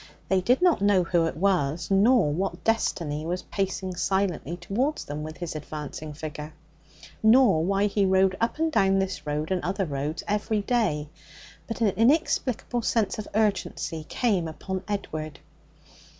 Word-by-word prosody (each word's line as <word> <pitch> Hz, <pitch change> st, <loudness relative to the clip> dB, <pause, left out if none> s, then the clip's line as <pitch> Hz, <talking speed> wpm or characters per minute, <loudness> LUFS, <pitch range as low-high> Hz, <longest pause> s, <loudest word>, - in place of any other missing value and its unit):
They 190 Hz, -1 st, +3 dB
did 250 Hz, -, +2 dB
not 355 Hz, -, +4 dB
know 200 Hz, -2 st, +4 dB
who 170 Hz, -1 st, +2 dB
it 165 Hz, -, -5 dB
was, 175 Hz, -3 st, 0 dB
nor 200 Hz, -, +4 dB
what 190 Hz, +5 st, -3 dB
destiny 165 Hz, -9 st, 0 dB
was 175 Hz, +3 st, -3 dB
pacing 190 Hz, -1 st, -3 dB
silently 180 Hz, -3 st, -1 dB
towards 235 Hz, -, -2 dB
them 145 Hz, +1 st, -5 dB
with 155 Hz, +1 st, -7 dB
his 175 Hz, -3 st, -5 dB
advancing 150 Hz, 0 st, -6 dB
figure, 150 Hz, 0 st, -7 dB, 0.7 s
nor 220 Hz, -7 st, +5 dB
why 195 Hz, +3 st, +2 dB
he 205 Hz, 0 st, +1 dB
rode 190 Hz, 0 st, +3 dB
up 230 Hz, -, 0 dB
and 320 Hz, 0 st, +1 dB
down 195 Hz, -8 st, +3 dB
this 185 Hz, -6 st, -2 dB
road 150 Hz, +3 st, -2 dB
and 185 Hz, -1 st, +1 dB
other 195 Hz, +2 st, -1 dB
roads 145 Hz, +1 st, -3 dB
every 210 Hz, +1 st, 0 dB
day; 200 Hz, -10 st, 0 dB, 0.6 s
but 225 Hz, -, -5 dB
an 220 Hz, -, +4 dB
inexplicable 245 Hz, -, +1 dB
sense 220 Hz, -2 st, 0 dB
of 210 Hz, -, -5 dB
urgency 165 Hz, -7 st, -1 dB
came 200 Hz, -9 st, +1 dB
upon 190 Hz, +4 st, -5 dB
Edward. 155 Hz, -7 st, -4 dB
190 Hz, 155 wpm, -26 LUFS, 155-210 Hz, 0.7 s, nor